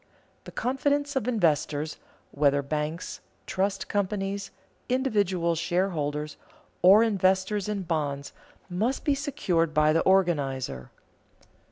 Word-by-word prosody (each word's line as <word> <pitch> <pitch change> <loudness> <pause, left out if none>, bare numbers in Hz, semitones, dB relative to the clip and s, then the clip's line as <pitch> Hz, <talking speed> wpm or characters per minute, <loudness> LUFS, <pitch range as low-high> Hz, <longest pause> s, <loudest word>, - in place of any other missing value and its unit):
The - - -9
confidence 285 +3 0
of 260 -3 -1
investors, 155 - 0 0.3
whether 140 0 +2
banks, 150 +4 -3 0.3
trust 195 +1 -1
companies, 200 0 -2 0.4
individual 205 -10 +1
shareholders 160 -4 -1 0.4
or 200 +5 +7
investors 195 -1 +1
in 205 -2 -2
bonds, 145 -5 -2 0.3
must 215 +9 -1
be 290 - +3
secured 185 - -1
by 155 0 +4
the 165 - +3
organizer. 140 - +1
185 Hz, 100 wpm, -27 LUFS, 155-210 Hz, 0.4 s, or